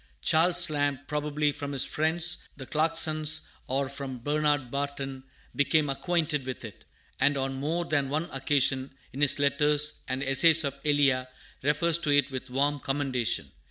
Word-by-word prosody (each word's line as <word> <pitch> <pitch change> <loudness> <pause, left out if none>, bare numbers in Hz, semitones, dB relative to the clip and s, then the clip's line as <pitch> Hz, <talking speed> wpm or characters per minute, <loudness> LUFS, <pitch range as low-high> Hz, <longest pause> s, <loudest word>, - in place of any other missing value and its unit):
Charles 170 - +4
Lamb, 145 -2 -1
probably 150 0 -1
from 145 0 -6
his 135 - +1
friends, 170 +3 0
the 135 - -7
Clarksons, 155 0 +2 0.2
or 135 +1 -1
from 135 -1 -7
Bernard 145 0 -1
Barton, 140 -1 -4 0.3
became 145 0 +1
acquainted 155 -1 -1
with 130 -2 -6
it, 105 -5 -12 0.3
and 140 +1 +2
on 135 0 -2
more 155 +6 -2
than 145 -4 -1
one 155 +4 -2
occasion, 135 -1 0 0.2
in 135 - -6
his 145 0 +4
letters 145 +1 +1
and 130 0 -3
Essays 155 +4 +6
of 140 -2 -2
Elia, 140 -4 +2 0.3
refers 155 +4 +1
to 155 - -3
it 145 -1 +2
with 130 0 -6
warm 145 +3 0
commendation. 130 - -1
145 Hz, 155 wpm, -27 LUFS, 135-155 Hz, 0.3 s, Essays